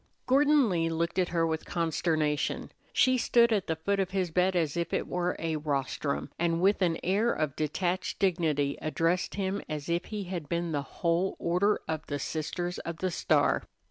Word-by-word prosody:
Gordon 285 0 +4
Lee 165 -4 +1
looked 170 +3 -1
at 180 - +1
her 165 -1 +1
with 160 -1 -1
consternation. 160 -3 -1 0.2
She 255 0 +3
stood 235 -1 +4
at 200 -2 0
the 160 - 0
foot 200 +5 -1
of 190 -2 0
his 185 -3 -1
bed 180 +2 +2
as 160 -5 +1
if 170 -1 -2
it - - -1
wore 180 0 -1
a 160 -1 -2
rostrum, 140 -1 -2
and 165 0 +1
with 195 +3 +3
an 170 -3 +2
air 205 +6 +2
of 155 -3 -1
detached 175 +4 -1
dignity 155 -7 +1
addressed 165 +3 0
him 195 0 -1
as 150 0 -4
if 170 +2 0
he 210 -2 -4
had 175 -5 -5
been 170 0 -1
the 145 -2 0
whole 170 +6 -1
Order 180 +5 +1
of 155 -1 -3
the 145 - -2
Sisters 170 +5 -3
of 170 -1 -5
the 185 +2 -1
Star. - - +2
170 Hz, 190 wpm, -29 LUFS, 160-190 Hz, 0.2 s, Gordon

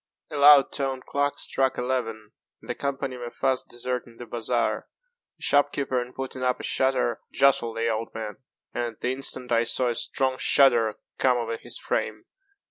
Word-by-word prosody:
A - - -5
loud 145 -1 +7
toned 135 -2 -2
clock 145 0 0
struck 135 -1 0
eleven, 115 -4 -2 0.3
and - - -17
the - - -1
company 135 -2 -3
were 120 -1 -5
fast 130 +1 -1
deserting 120 -1 -4
the 120 - -8
bazaar. 115 -1 -1 0.5
A - - -31
shop 145 0 +3
keeper, 130 -3 -1
in 120 +1 -7
putting 130 0 -6
up 125 -1 +1
a - - -7
shutter, 130 -3 +1
jostled 120 -4 +3
the 115 0 0
old 115 0 -1
man, 110 -2 -5 0.4
and 120 -1 -2
at - - -41
the 125 - 0
instant 130 -2 -4
I 115 0 +4
saw 120 +2 +2
a - - 0
strong 130 +2 -1
shudder 120 -6 +4 0.2
come 125 -1 +4
over 115 -1 -2
his - - -7
frame. - - -2
125 Hz, 185 wpm, -26 LUFS, 115-135 Hz, 0.5 s, loud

